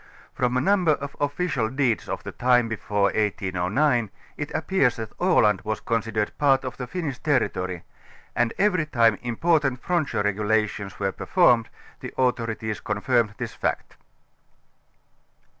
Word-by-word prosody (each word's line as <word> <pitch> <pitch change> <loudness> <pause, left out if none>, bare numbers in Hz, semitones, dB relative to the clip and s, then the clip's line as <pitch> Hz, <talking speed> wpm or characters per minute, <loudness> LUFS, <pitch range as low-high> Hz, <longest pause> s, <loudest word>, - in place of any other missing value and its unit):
From 125 0 0
a - - +2
number 180 -1 +3
of 140 -1 -6
official 145 -5 -1
deeds 130 -3 0
of - - -4
the - - -6
time 125 -1 +3
before 105 -2 -2
1809 105 +5 0 0.3
it 150 - -5
appears 155 -7 +1
that 110 -1 -7
Aland 110 - +3
was 110 0 -3
considered 110 -2 -1
part 135 -2 +3
of 130 - -5
the 125 - -5
Finnish 145 -3 -4
ter 145 -4 +3
ritory 90 -2 -4 0.5
and 120 -1 +2
every 185 -6 +2
time 115 -6 +3
important 135 +2 +1
frontier 165 -11 0
regulations 105 -1 -1
were 100 -1 0
performed, 120 - +3 0.3
the - - -7
authorities 115 -4 -1
confirmed 105 0 0
this - - -5
fact. - - -3
120 Hz, 140 wpm, -24 LUFS, 105-145 Hz, 0.5 s, number